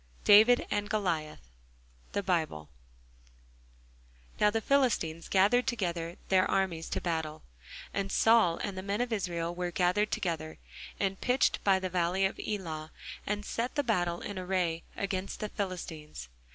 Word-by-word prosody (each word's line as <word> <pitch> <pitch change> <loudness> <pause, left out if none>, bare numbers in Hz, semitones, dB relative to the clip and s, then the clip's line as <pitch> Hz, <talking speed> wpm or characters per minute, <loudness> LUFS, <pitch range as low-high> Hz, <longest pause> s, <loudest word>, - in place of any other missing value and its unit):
DAVID 220 +4 +7
AND 205 0 -1
GOLIATH 165 - -2 0.7
Now 170 - 0 1.8
the 225 +2 0
Philistines 215 - +1
gathered 210 +7 +4
together 175 -8 -2
their 185 -1 +4
armies 185 -4 0
to - - -1
battle, 160 -3 -3 0.5
and 195 -1 -2
Saul 225 -7 +4
and 200 - -3
the 185 - -4
men 200 +2 -2
of 245 -1 -1
Israel 170 -4 -2
were 180 0 -2
gathered 180 +4 +1
together, 160 -3 -3 0.4
and 195 -1 -1
pitched 250 +1 +2
by 195 -1 +4
the 190 0 -2
valley 180 +2 +1
of 190 - -2
Elah, 160 -7 -4 0.4
and 210 0 -2
set 235 +5 -3
the 290 - +1
battle 175 -8 0
in 200 -2 -5
array 180 -3 -1 0.2
against 195 -1 -3
the 215 - -3
Philistines. 165 - -6
190 Hz, 140 wpm, -30 LUFS, 170-205 Hz, 1.8 s, DAVID